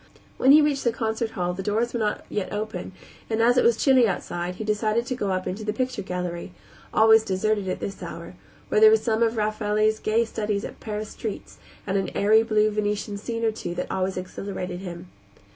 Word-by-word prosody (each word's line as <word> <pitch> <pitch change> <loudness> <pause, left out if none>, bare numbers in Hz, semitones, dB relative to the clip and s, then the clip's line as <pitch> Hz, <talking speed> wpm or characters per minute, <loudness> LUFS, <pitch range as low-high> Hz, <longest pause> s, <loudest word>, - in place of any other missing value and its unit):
When 265 - +5
he 300 +1 +8
reached 285 -2 +1
the 235 - +2
concert 225 0 -2
hall 180 0 0
the 190 - -5
doors 220 +4 0
were 240 - -1
not 210 -1 -1
yet 205 -3 -3
open 210 -3 -4 0.4
and, 220 0 0
as 240 +2 +4
it 250 - +4
was 235 -1 +4
chilly 260 -3 +5
outside, 180 -2 -3
he 220 - -5
decided 215 +2 0
to 255 - -3
go 205 -5 -2
up 185 -1 -1
into 200 +4 -4
the 210 0 -2
picture 255 -1 -2
gallery 180 -1 -5 0.4
always 220 0 +6
deserted 205 0 -1
at - - -2
this 195 - -6
hour - - -7 0.4
where 430 - +2
there 435 - +10
were 440 - +6
some 225 - -1
of 230 0 +2
Raffelli's 215 0 +1
gay 225 +2 +1
studies 210 -2 -2
of - - -8
Paris 210 -1 -5
streets 215 -3 -7 0.3
and 195 0 0
an 190 -2 -2
airy 215 +2 +5
blue 215 -1 +2
Venetian 210 0 -2
scene 230 +2 -3
or 220 - +3
two 175 -5 -6
that 180 - -4
always 190 0 -1
exhilarated 185 -1 -5
him. 175 -1 -8
215 Hz, 210 wpm, -25 LUFS, 195-225 Hz, 0.4 s, there